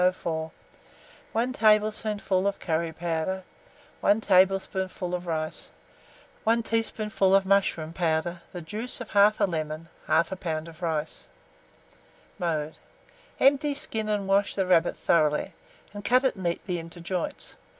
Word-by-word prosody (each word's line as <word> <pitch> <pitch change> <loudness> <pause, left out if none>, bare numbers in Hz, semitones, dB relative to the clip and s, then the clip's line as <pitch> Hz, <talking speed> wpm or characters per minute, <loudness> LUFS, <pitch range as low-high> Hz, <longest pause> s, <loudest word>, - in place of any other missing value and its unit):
104, 165 -3 0 0.8
1 240 +3 0
tablespoonful 210 -3 +2
of 200 - -1
curry 165 -1 -1
powder, 170 +3 -2 0.6
1 205 - +3
tablespoonful 190 -2 +2
of 180 - -1
flour, 155 -2 -1 0.9
1 230 +1 +2
teaspoonful 215 -4 +1
of 195 -1 +4
mushroom 190 -5 +1
powder, 170 0 -1
the 175 -2 -7
juice 220 +11 -5
of 245 - -7
1/2 205 0 +4
lemon, 155 -1 -4 0.2
1/2 170 +4 +2
lb. 160 -2 -3
of 165 +1 -13
rice. 155 - -3 1.1
Mode. 160 -3 -2 0.6
Empty, 285 +1 +4
skin, 225 -7 -3
and 205 -2 -1
wash 200 +1 +2
the 195 - +1
rabbit 175 -2 +3
thoroughly, 150 -3 +2 0.4
and 205 0 -7
cut 255 +4 +4
it 265 - +2
neatly 180 -1 -2
into 165 +1 -10
joints. 175 +1 -4
185 Hz, 130 wpm, -27 LUFS, 165-210 Hz, 1.1 s, of